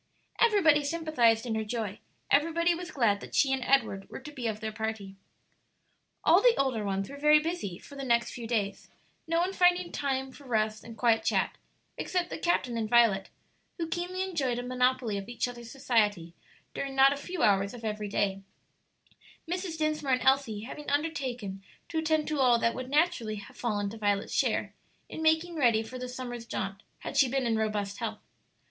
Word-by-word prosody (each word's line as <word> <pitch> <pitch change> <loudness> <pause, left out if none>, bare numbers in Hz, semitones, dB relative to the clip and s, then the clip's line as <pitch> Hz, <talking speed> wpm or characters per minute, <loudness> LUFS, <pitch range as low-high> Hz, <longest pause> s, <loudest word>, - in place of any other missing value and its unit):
Everybody 355 -10 +5
sympathized 285 -8 +2
in 235 - -2
her 220 0 -1
joy; 215 -2 -4 0.3
everybody 335 +4 +3
was 355 +1 -6
glad 225 - +2
that - - -9
she 270 -1 +4
and 265 - -1
Edward 225 -8 +1
were - - -7
to 275 +3 -10
be 250 -5 -4
of 215 -1 -3
their 220 0 -4
party. 215 -3 -4 1.1
All - - +6
the - - +5
older 260 -6 0
ones 195 -1 -2
were 280 - -9
very 300 +1 +6
busy 305 - -3
for - - -14
the 275 - -5
next 235 -2 +2
few 235 -2 -7
days, 210 -4 -2 0.4
no 330 0 +1
one 365 +3 0
finding 360 -1 +3
time 265 -2 -2
for 280 +2 -15
rest 215 -3 0
and 230 -1 -10
quiet 225 0 +3
chat - - +1 0.4
except 360 -1 -1
the - - -4
captain 255 -9 0
and 220 -1 -2
Violet, 225 -5 +4 0.5
who 335 -2 -2
keenly 360 +2 -2
enjoyed 285 -10 -1
a 245 - -3
monopoly 250 -3 +1
of 195 - -9
each 240 - -1
other's 240 -1 -9
society 210 -10 0 0.4
during 275 -1 -4
not 270 +1 +6
a - - -4
few 350 +5 -4
hours 200 +1 +3
of 230 -2 -9
every 210 -1 -3
day; 195 -1 0 1.1
Mrs. 355 -1 -3
Dinsmore 305 -3 0
and 255 - +1
Elsie 265 -6 +2
having 290 +6 -7
undertaken 260 -10 -2 0.3
to 320 - -1
attend 315 -1 +1
to 305 -2 -1
all 250 -3 +5
that 230 0 +1
would 255 0 -6
naturally 290 -8 +1
have 205 -1 -10
fallen 205 -4 -1
to 225 - -9
Violet's 205 -1 0
share - - 0 0.4
in - - -6
making 320 +2 +2
ready 235 -6 +3
for 250 +3 -8
the 250 0 -5
summer's 245 -2 -6
jaunt 195 -1 -4 0.2
had - - -5
she 265 - +5
been 265 0 0
in 230 -1 +1
robust 210 -2 -2
health. 220 -3 -4
250 Hz, 190 wpm, -29 LUFS, 220-300 Hz, 1.1 s, All